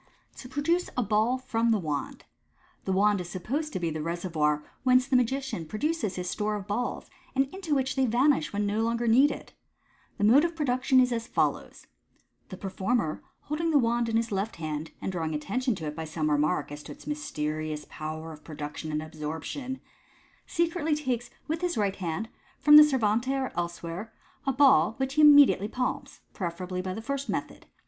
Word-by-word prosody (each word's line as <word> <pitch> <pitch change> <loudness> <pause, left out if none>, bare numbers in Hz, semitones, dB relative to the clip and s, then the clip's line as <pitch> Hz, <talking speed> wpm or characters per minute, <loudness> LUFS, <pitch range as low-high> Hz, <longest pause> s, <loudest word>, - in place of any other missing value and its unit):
To 250 - -9
Produce 330 +6 0
a 250 - +2
Ball 215 +4 +2
from 235 -2 0
the 225 - +4
Wand. 150 -6 -4 0.3
— - - -35
The 190 - -1
wand 200 +1 +3
is 175 - -7
supposed 270 - -3
to - - -2
be 170 -2 -1
the 155 0 -4
reservoir 160 -3 0 0.2
whence 255 -1 +4
the 270 - 0
magician 255 - 0
produces 220 - -1
his 180 -1 -4
store 210 +3 -1
of 200 -2 -5
balls, 210 +5 -3 0.3
and 270 +1 +3
into 360 -6 -1
which 265 -1 0
they 265 -1 +2
vanish 240 - +2
when 205 0 -1
no 205 +2 0
longer 235 +1 0
needed. 260 +6 +3 0.6
The - - -2
mode 245 +8 +6
of 340 -1 -1
production 260 -3 +2
is 250 0 +4
as 230 -1 -2
follows:— - - -1 0.6
The 185 - -7
performer, 195 -2 -1 0.2
holding 320 +3 -2
the 310 - +4
wand 235 -2 +1
in 225 - +2
his 230 0 -1
left 200 +3 -2
hand, 155 -1 -4
and - - -1
drawing 160 -4 -2
attention 220 - -1
to 160 - -6
it 150 0 -4
by 160 - -5
some 155 -1 -1
remark 150 +1 +1
as 145 0 -7
to - - -10
its - - -12
mys 300 0 -4
terious 150 0 -3
power 155 +1 -6
of 150 - -14
production 150 0 -6
and 155 0 -2
absorption, 160 - -5 0.7
secretly 335 -3 0
takes 255 -5 -2 0.2
with 320 +2 -2
his 355 -8 -1
right 200 -2 0
hand, 180 +3 -3 0.3
from 295 +3 +6
the 300 - +12
servante 255 -2 +1
or 265 -1 -2
elsewhere, 175 +4 -4 0.4
a - - +4
balf, 270 -4 +5
which 265 0 -2
he 305 +1 +4
imme 290 -2 +10
diately 205 +3 -2
palms 255 +1 -3
(preferably 180 0 -4
by 185 0 -4
the 220 - -6
first 280 +2 -3
method). - - -4
220 Hz, 195 wpm, -28 LUFS, 170-265 Hz, 0.7 s, the